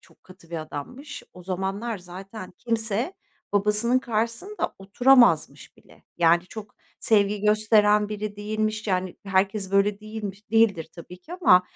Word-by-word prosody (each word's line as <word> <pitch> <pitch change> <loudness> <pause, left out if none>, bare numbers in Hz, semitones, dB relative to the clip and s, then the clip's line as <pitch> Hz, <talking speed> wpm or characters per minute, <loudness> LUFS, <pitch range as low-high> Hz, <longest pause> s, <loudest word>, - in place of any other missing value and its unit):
çok - - -24
katı 185 -2 -17
bir 170 - -4
adammış. 250 - -8
O 180 - -12
zamanlar 195 +4 -3
zaten 185 +3 -10
kimse 230 - -2 0.4
babasının 210 +5 +2
karşısında 235 - -3
oturamazmış 245 +6 +3
bile. - - -21 0.2
Yani, 170 0 +4
çok 215 0 -10 0.3
sevgi 205 -2 +2
gösteren 210 0 +3
biri 210 -1 -5
değilmiş, 215 +1 -2
yani, 185 -2 -1
herkes 195 0 0
böyle 200 +1 +2
değilmiş 215 -1 -7
değildir 215 -8 +3
tabii 175 +1 -11
ki 315 - -13
ama, 335 - +5
210 Hz, 135 wpm, -25 LUFS, 190-225 Hz, 0.4 s, ama